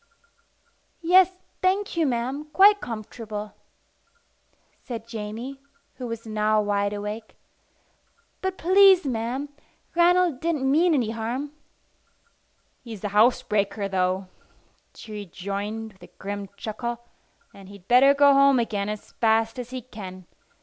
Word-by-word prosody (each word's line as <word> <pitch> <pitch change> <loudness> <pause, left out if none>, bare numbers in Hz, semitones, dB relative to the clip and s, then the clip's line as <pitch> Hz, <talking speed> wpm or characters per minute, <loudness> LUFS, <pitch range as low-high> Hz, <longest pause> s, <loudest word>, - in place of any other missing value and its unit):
"Yes, 365 +2 +6 0.3
thank 385 +2 +1
you, 330 -3 +2
ma'am, 260 +4 -2
quite 405 +1 +6
comfortable," 215 -2 -6 1.3
said 230 -2 -7
Jamie, 230 +5 -6 0.4
who 250 -1 -5
was 230 0 -6
now 215 0 +1
wide 205 -1 0
awake. 210 +2 -6 1.1
"But, 380 0 -2
please 375 0 +6
ma'am, 250 +3 -2 0.4
Ranald 345 -4 +3
didn't 295 -5 0
mean 330 +3 +4
any 235 -5 0
harm." 235 +6 -4 1.3
"He's 225 -5 -9
a 205 - -1
housebreaker, 210 -2 +2
though," 185 0 -1 0.7
she 220 - -11
rejoined 205 +2 -5
with 190 - -27
a - - -15
grim 200 0 -5
chuckle; 235 +3 -5 0.5
"and 195 -1 -14
he'd 200 -2 -14
better 270 +3 +6
go 285 0 +6
home 275 -1 +5
again 210 -4 -1
as 210 0 -7
fast 225 +1 +1
as 245 -1 -6
he 255 -1 -6
can. 185 -6 -10
230 Hz, 120 wpm, -25 LUFS, 210-275 Hz, 1.3 s, Yes